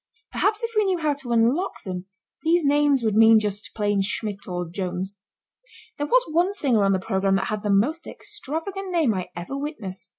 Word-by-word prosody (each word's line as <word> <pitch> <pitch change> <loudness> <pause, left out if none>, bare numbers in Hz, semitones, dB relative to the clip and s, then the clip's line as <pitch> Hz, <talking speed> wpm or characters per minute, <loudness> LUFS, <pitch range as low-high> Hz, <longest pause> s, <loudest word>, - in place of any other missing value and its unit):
Perhaps 425 +2 0
if 460 - -2
we 425 -1 +3
knew 380 -2 +1
how 310 -3 +1
to 275 -4 -8
unlock 235 +10 +1
them 185 -2 -5 0.4
these 335 0 +2
names 285 -2 +3
would 220 -2 +1
mean 225 +1 +7
just 210 -1 -1
plain 205 -2 +1
Schmidt 200 +1 -3
or 180 -1 -3
Jones. 185 +2 -4 0.8
There 290 - -1
was - - +4
one 350 +5 +1
singer 250 - +2
on 195 0 +3
the - - +2
programme 195 +1 +1
that 195 0 -1
had 215 -1 -2
the 210 - -2
most 270 +12 +1
extravagant 370 +7 -5
name 320 -10 +2
I 185 -2 -3
ever 175 +10 -5
witnessed. 215 - -6
225 Hz, 195 wpm, -24 LUFS, 195-315 Hz, 0.8 s, mean